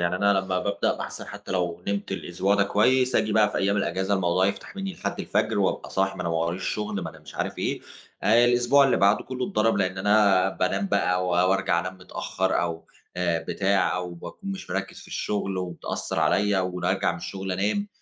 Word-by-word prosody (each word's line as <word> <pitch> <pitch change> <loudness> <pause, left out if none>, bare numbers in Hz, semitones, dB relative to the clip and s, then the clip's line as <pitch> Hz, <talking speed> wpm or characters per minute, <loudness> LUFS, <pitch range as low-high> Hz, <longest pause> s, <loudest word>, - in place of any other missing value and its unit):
يعني 85 +1 +1
أنا 100 +2 +3
لمّا 95 -1 -1
بابدأ 100 +2 0
باحسن - - -6
حتى - - -8
لو 90 -2 -1
نمت 100 0 -2
الأسبوع 100 +1 0
ده 100 -1 +3
كويس، 125 +5 +2
آجي 110 - +2
بقى 105 -1 +4
في - - -4
ايام 100 +1 +1
الأجازة، 95 +1 0
الموضوع 95 0 +2
يفتح 100 - -4
مني 195 -1 -3
لحد - - -4
الفجر - - 0
وابقى - - 0
صاحي، 95 0 0
ما - - -6
أنا 85 - -2
ما 85 - 0
وراييش 85 +3 -1
شغل، 105 0 -2
ما 80 - -5
أنا 80 - -15
مش - - -14
عارف - - -3
ايه، - - -1 0.4
آآ 115 +3 +5
الأسبوع 125 +3 +4
اللي 135 - +3
بعده 100 +2 +3
كله 130 0 -3
اتضرب، 105 +1 +2
لأن 95 -1 0
أنا 100 -2 +4
بانام 95 +1 -1
بقى 90 -2 +1
و - - -1
وارجع 90 0 +2
أنام 90 +1 -5
متأخر 95 +1 -1
أو 85 -1 -3 0.3
آآ 85 -2 0
بتاع 100 -1 +1
أو 90 -1 -4
باكون 195 - -8
مش 195 - -7
مركّز 95 +1 -3
في - - -14
الشغل 100 -2 -2
وبتأثر 90 -2 -4
عليا 100 -1 +2
وراجع 90 -1 0
من - - -6
الشغل 95 -1 -5
أنام، 105 - 0
95 Hz, 205 wpm, -25 LUFS, 90-105 Hz, 0.4 s, آآ